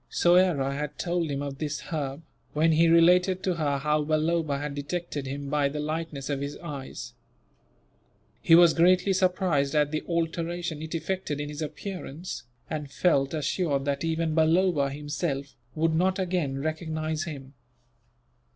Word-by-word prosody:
Soyera 175 -6 +3
had 150 +1 -4
told 170 -2 -1
him 140 0 -2
of 140 -1 -6
this 155 -1 -2
herb, 145 -2 -4 0.3
when 160 +2 +3
he 165 +1 +4
related 180 +3 +4
to 185 - +1
her 150 -4 0
how 150 +2 +1
Balloba 155 -1 +1
had 145 0 -4
detected 145 -1 -4
him 140 +1 -5
by 145 0 +1
the 150 +2 -5
lightness 155 -2 -3
of 140 -2 -2
his 140 +1 -4
eyes. 145 -6 -7 1.3
He 165 - +6
was 170 -1 +7
greatly 180 +3 +4
surprised 180 -7 +1
at 150 -1 +3
the 155 - -1
alteration 170 -1 -2
it 160 +1 -5
effected 165 -2 -2
in 145 0 -4
his 150 +1 -6
appearance, 155 -4 -6 0.2
and 150 -2 -4
felt 140 -2 +1
assured 145 -2 0
that 140 +1 -1
even 165 -1 0
Balloba 160 -2 +3
himself 145 0 -3 0.2
would 160 +1 +1
not 185 +3 +2
again 175 -7 -1
recognize 155 +1 -2
him. 140 -4 -8
155 Hz, 150 wpm, -27 LUFS, 145-170 Hz, 1.3 s, was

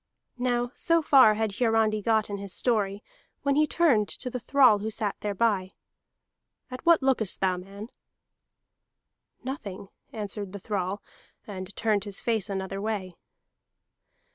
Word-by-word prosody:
Now 245 -1 0
so 335 -1 +2
far 260 -8 +6
had 215 -2 -2
Hiarandi 225 -3 +2
got 220 0 +1
in 200 - -3
his 200 -1 -7
story, 210 -4 0 0.4
when 280 0 +2
he 305 +2 +3
turned 270 -14 +3
to 250 - -3
the 250 - -4
thrall 255 -4 +4
who 215 +2 -3
sat 210 -2 -2
thereby. 200 -2 0 1.0
"At 255 - -7
what 335 -5 +5
lookest 245 -7 +1
thou, 185 -1 +1
man?" 200 +4 -9 1.5
"Nothing," 200 -8 -6 0.2
answered 205 -4 -5
the 200 - -6
thrall, 195 0 -3 0.4
and 190 -1 -8
turned 215 -3 0
his 200 -2 -3
face 225 -5 -1
another 195 0 -4
way. 205 -4 -3
215 Hz, 140 wpm, -27 LUFS, 200-245 Hz, 1.5 s, far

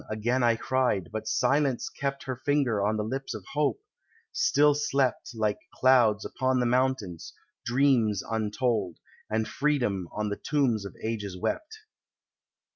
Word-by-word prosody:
again 115 +4 0
I 120 -1 +4
cried,—but 110 -4 -1
Silence 135 +2 +1
kept 140 0 -4
Her 130 - -4
finger 130 -5 +1
on 110 +1 +1
the 105 - -1
lips 135 +4 -4
of 100 -4 -8
Hope: 150 - 0 0.5
still 150 - +4
slept, 140 -3 0
Like 105 -2 0 0.2
clouds 120 -5 +4
upon 130 0 0
the 125 - +1
mountains, 120 -8 -1 0.3
dreams 120 -5 +2
untold, 110 -3 -1 0.3
And 110 0 0
Freedom 120 - 0
on 105 0 -2
the 105 - -3
tomb 140 -6 +2
of 100 - -8
ages 105 -4 -3
wept. 375 - -3
120 Hz, 135 wpm, -28 LUFS, 105-135 Hz, 0.5 s, I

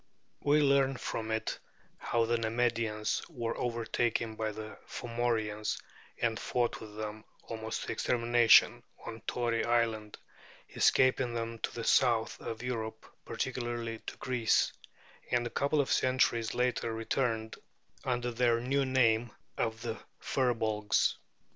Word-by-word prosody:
We 150 +1 +3
learn 135 -1 +3
from 110 -2 -4
it 110 0 -2 0.4
how 115 -1 +1
the 120 +1 +1
Nemedians 115 -1 0
were 115 -2 -3
overtaken 115 -1 -1
by 110 -1 -2
the 110 +1 -8
Fomorians 115 -3 -1 0.4
and 115 -1 0
fought 120 -1 -1
with 105 -1 -10
them, 110 0 -5 0.2
almost 110 0 -4
to - - -4
extermination, 120 -1 +5 0.2
on 115 0 -7
Tory 120 -2 0
Island, 115 -3 0 0.6
escaping 130 -2 +3
then 115 0 -3
to - - -3
the 115 - -4
south 115 -3 +3
of 115 +1 -5
Europe, 115 -3 -4 0.2
particularly 120 -3 -3
to - - -6
Greece; 120 -3 +1 0.6
and 120 -1 +1
a 120 - -4
couple 140 +2 +1
of 140 - +1
centuries 120 -3 +2
later 125 -2 0
returned, 115 0 -1 0.5
under 120 -1 -1
their 120 0 +2
new 135 +3 +1
name 120 -3 +3 0.2
of 110 -1 -2
the 115 -1 -3 0.2
Firbolgs. 110 -5 +1
115 Hz, 130 wpm, -31 LUFS, 110-125 Hz, 0.6 s, extermination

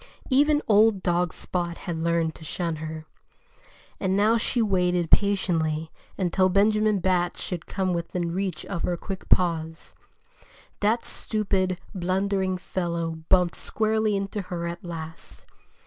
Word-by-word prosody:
Even 295 +3 +4
old 210 -2 +4
dog 175 -1 +1
Spot 175 -2 -3
had 170 -3 -4
learned 165 -1 +1
to - - -12
shun 165 +1 -2
her. 155 0 -6 0.9
And 190 0 +1
now 215 +3 +4
she 235 +2 0
waited 180 -5 +1
patiently 165 -6 +2 0.3
until 185 0 +2
Benjamin 210 +2 +3
Bat 180 -1 +1
should 175 -3 -5
come 190 -2 -1
within 170 0 -2
reach 185 -3 -2
of 175 -4 -4
her 175 - -1
quick 190 +2 -7
paws. 165 -3 +1 0.9
That 220 +3 +1
stupid, 195 -4 -1
blundering 190 0 0
fellow 170 -2 -2 0.2
bumped 180 -2 +4
squarely 220 -1 0
into 200 +1 -2
her 175 -2 -5
at 170 0 -5
last. 160 -2 -7
185 Hz, 130 wpm, -26 LUFS, 170-200 Hz, 0.9 s, Even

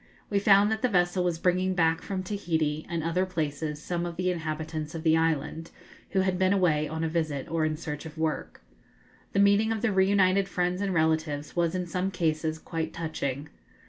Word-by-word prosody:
We 200 - +3
found 200 +1 +5
that 220 0 -1
the 250 - +2
vessel 180 -2 +2
was 175 -2 0
bringing 185 +2 +1
back 165 -1 +2
from 190 -2 -4
Tahiti 160 -6 -1
and 170 -3 -2
other 165 +3 +1
places 155 -4 -3
some 170 +2 -3
of 175 -1 -4
the 185 +1 0
inhabitants 160 -1 -4
of 160 - -5
the 160 -1 +4
island, 160 0 0 0.4
who 190 - +2
had 185 -1 0
been 185 +1 +3
away 160 -6 +2
on 160 +1 -3
a - - +1
visit 155 -4 -2
or 165 -1 0
in 155 0 -1
search 150 -1 -5
of 160 +1 -12
work. 160 -1 -3 0.7
The 200 - +2
meeting 200 +2 +4
of 225 0 -2
the 230 - +2
reunited 190 0 +3
friends 180 +1 -1
and 200 -1 0
relatives 160 -3 0
was 170 0 +1
in 180 -1 -1
some 180 +2 -1
cases 160 -3 -1
quite 160 0 -4
touching. 150 -3 -3
170 Hz, 200 wpm, -28 LUFS, 160-185 Hz, 0.7 s, found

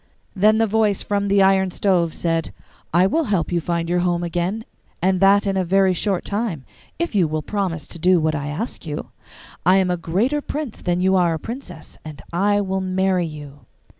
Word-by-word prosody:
Then 210 +3 +4
the 225 - +3
voice 215 -2 +1
from 200 0 -1
the 200 0 +4
iron 190 0 +3
stove 180 -3 +1
said, 165 0 -1 0.4
'I 175 +3 +4
will 320 +12 +1
help 190 -8 0
you 175 - +1
to 160 - -11
find 170 -1 -1
your 175 +1 +1
home 175 -1 0
again, 175 +6 -2 0.3
and 185 +2 +1
that 200 +2 +5
in 195 -1 0
a 190 - +1
very 190 +1 +3
short 190 +1 -1
time, 200 - -3 0.3
if 340 -5 -2
you 185 -5 +3
will 155 0 -3
promise 180 -7 -2
to 170 - -7
do 180 +1 +4
what 155 0 0
I 145 -1 -3
ask 165 +5 -4
you. 150 -1 -5 0.5
I 185 +3 +5
am 185 -2 +2
a 180 - 0
greater 215 - 0
prince 290 -5 -5
than 175 0 0
you 190 +1 +3
are 170 -2 +2
a - - -5
princess, 225 - -8
and 155 -3 -9
I 205 +3 +2
will 190 -1 -2
marry 185 -1 0
you. 145 -2 -11
185 Hz, 210 wpm, -21 LUFS, 170-200 Hz, 0.5 s, that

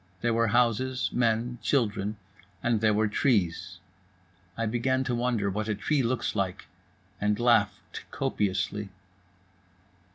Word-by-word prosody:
There 120 0 +1
were 115 0 +2
houses, 125 +3 +1
men, 120 0 0
children. 105 -5 0 0.5
And 115 -3 +1
there 110 -1 +4
were 105 +1 +2
trees. 95 -6 0 0.8
I 115 - 0
began 125 +4 0
to 130 - -2
wonder 120 -4 0
what 105 +2 -3
a 105 - 0
tree 140 +8 0
looks 125 -1 -1
like, 95 -3 -2 0.6
and 105 +1 +1
laughed 105 -5 +1
copiously. 105 +1 -1
115 Hz, 125 wpm, -28 LUFS, 105-120 Hz, 0.8 s, there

